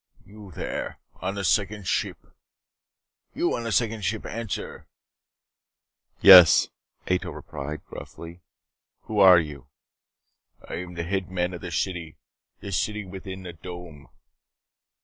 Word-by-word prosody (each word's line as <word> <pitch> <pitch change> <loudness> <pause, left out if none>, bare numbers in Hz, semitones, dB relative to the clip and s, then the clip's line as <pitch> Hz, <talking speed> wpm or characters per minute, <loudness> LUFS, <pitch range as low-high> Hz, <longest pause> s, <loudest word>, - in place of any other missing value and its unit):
"You 105 -1 -13
there, - - -5 0.2
on 95 +2 -4
the 100 - -3
Second 100 +1 0
ship. - - -1 1.2
You - - +1
on 120 - -5
the 115 - -2
second 110 +1 +1
ship. 110 +2 -2
Answer." 115 -2 -6 1.3
"Yes!" 90 -4 +9 0.4
Ato 90 0 0
replied 75 +2 -7
gruffly. 85 +2 -10 0.6
"Who 105 -1 -3
are 95 -3 +9
you?" 75 -5 -7 1.0
"I - - -5
am 90 0 -7
the 85 - -3
head 95 +1 -2
man 90 -1 -2
of 90 - -7
the 90 - -6
city 85 -2 -3 0.4
the 100 - -7
city 105 +2 -1
within 95 0 -8
the 90 -2 -8
dome." 85 -4 -10
90 Hz, 130 wpm, -25 LUFS, 85-100 Hz, 1.3 s, Yes